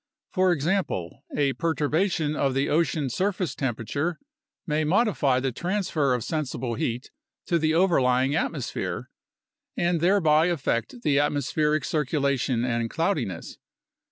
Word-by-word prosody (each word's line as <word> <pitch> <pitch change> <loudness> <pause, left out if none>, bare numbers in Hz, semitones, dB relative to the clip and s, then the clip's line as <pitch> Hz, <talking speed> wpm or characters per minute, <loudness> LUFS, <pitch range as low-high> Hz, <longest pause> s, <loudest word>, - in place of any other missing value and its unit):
For 185 -1 +3
example, 150 - -1
a 140 -2 +2
perturbation 160 0 0
of 135 -3 0
the 135 +1 +1
ocean 155 -2 +1
surface 185 - -1
temperature 135 - -2 0.5
may 155 -1 0
modify 155 - +2
the 135 0 -1
transfer 170 - 0
of 120 - -3
sensible 130 -4 -3
heat 120 +3 -3 0.3
to 170 -2 +1
the 160 0 +1
overlying 135 -7 +3
atmosphere, 150 -5 -3 0.7
and 175 -2 +1
thereby 165 -4 +4
affect 170 - -2
the 140 -6 +3
atmospheric 145 +1 +1
circulation 140 -5 0
and 115 -2 -1
cloudiness. 145 - -2
150 Hz, 120 wpm, -26 LUFS, 130-170 Hz, 0.7 s, thereby